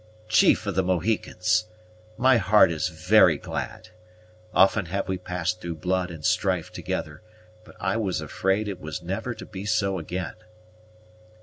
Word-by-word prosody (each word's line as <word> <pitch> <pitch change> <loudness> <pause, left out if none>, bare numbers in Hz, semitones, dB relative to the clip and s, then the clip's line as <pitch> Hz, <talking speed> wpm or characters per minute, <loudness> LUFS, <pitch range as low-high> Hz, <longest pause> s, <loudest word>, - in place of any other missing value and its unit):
"Chief 110 - +4
of 100 - -2
the 95 - +2
Mohicans! 95 +2 0 0.5
My 130 0 +5
heart 105 -3 +5
is 80 0 -1
very 80 -2 +4
glad. 90 - -6 0.6
Often 95 +1 +4
have 100 +3 -2
we 95 -1 -2
passed 90 0 -3
through 85 -1 -4
blood 90 +2 -1
and 80 -3 -8
strife 90 -2 +1
together, 75 0 -5 0.4
but - - -16
I - - 0
was 100 -5 -1
afraid 95 +3 -1
it 100 -3 -5
was 80 -1 -6
never - - -3
to - - -9
be 95 - -8
so 100 -3 0
again." 90 +2 -4
95 Hz, 150 wpm, -25 LUFS, 90-100 Hz, 0.6 s, My